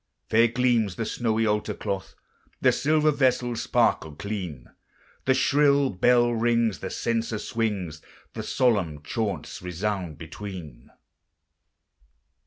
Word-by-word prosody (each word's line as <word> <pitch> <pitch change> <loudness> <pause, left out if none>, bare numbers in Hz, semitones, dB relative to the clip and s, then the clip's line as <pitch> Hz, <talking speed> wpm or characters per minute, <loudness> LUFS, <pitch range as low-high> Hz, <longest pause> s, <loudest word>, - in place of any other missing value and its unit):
Fair 115 +2 +6
gleams 120 -5 +1
the 115 - -3
snowy 115 0 0
altar 105 0 0
cloth, 95 -2 -4 0.4
The - - +4
silver 155 +1 +2
vessels 125 -4 +1
sparkle 80 -2 +1
clean, 90 - -5 0.6
The 130 - +4
shrill 140 0 +3
bell 120 +5 +3
rings, 115 -2 +1
the 95 - -5
censer 115 0 -1
swings, 100 -9 -3 0.3
And - - -5
solemn 95 - +1
chaunts 100 -2 -3
resound 90 -2 -3
between. 80 -6 -9
110 Hz, 110 wpm, -26 LUFS, 90-120 Hz, 0.6 s, Fair